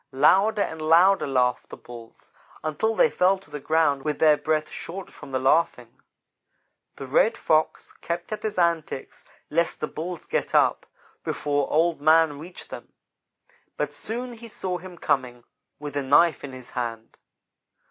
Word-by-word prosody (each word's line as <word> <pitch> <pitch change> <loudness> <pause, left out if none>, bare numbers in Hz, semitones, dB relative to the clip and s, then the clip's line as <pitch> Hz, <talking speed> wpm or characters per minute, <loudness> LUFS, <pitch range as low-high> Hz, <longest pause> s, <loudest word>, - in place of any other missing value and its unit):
Louder 200 +9 +4
and 160 0 -6
louder 170 +5 +4
laughed 125 -2 0
the - - -9
Bulls, 120 -2 -13 0.3
until 155 +9 -1
they - - +5
fell 185 +2 +2
to 185 -6 -18
the 150 - -5
ground 150 -2 +1
with 150 0 -2
their 155 -2 +5
breath 155 0 -1
short 190 +3 -7
from - - -12
the 130 - 0
laughing. 130 -3 +1 1.0
The 135 - -7
Red 180 - +2
Fox 155 0 0
kept 170 +2 -5
at 215 - -4
his 215 -2 -4
antics 170 -6 -1 0.3
lest 170 +2 0
the - - -1
Bulls 170 +3 -6
get - - -2
up - - +3 0.4
before 145 -1 -1
Old 165 0 +2
man 155 -1 +4
reached 175 +4 -10
them; - - -9 0.9
but - - -2
soon 245 +2 -4
he 230 0 -11
saw 185 -4 -4
him 180 0 -11
coming, 125 -6 -1 0.3
with 145 -1 -7
a 145 - 0
knife 145 +4 +3
in 140 - -6
his 130 -1 -11
hand. 115 -2 -5
155 Hz, 160 wpm, -25 LUFS, 140-180 Hz, 1.0 s, they